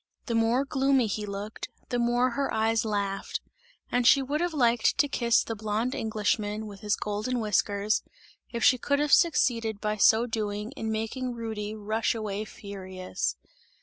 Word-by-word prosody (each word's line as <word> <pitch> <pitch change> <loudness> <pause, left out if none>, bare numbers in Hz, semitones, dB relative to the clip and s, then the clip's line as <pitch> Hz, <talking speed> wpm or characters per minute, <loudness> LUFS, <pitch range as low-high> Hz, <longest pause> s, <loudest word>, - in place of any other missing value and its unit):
The 235 - -2
more 230 +4 +2
gloomy 270 -2 +2
he 210 0 -3
looked, 200 +2 -6 0.2
the 245 - 0
more 240 +1 +2
her 275 +3 -1
eyes 225 +1 +1
laughed 200 -2 -2 0.5
and 245 -1 +2
she 275 0 +6
would 290 +4 -1
have 350 0 0
liked 240 -6 +2
to 290 +1 +4
kiss 235 -4 +2
the 225 - -4
blonde 220 +4 -1
Englishman 215 0 -1
with 200 -2 -9
his 210 0 0
golden 215 +5 -2
whiskers, 210 -1 +1 0.5
if 235 -2 -3
she 255 - +5
could 285 +4 +1
have 295 0 +1
succeeded 230 - +3
by 215 0 -1
so 220 +3 +5
doing, 215 -1 -3
in 225 -5 -4
making 240 +3 -3
Rudy 220 -2 -4
rush 215 +2 -1
away 215 -1 -3
furious. 190 -3 -5
220 Hz, 165 wpm, -28 LUFS, 210-245 Hz, 0.5 s, she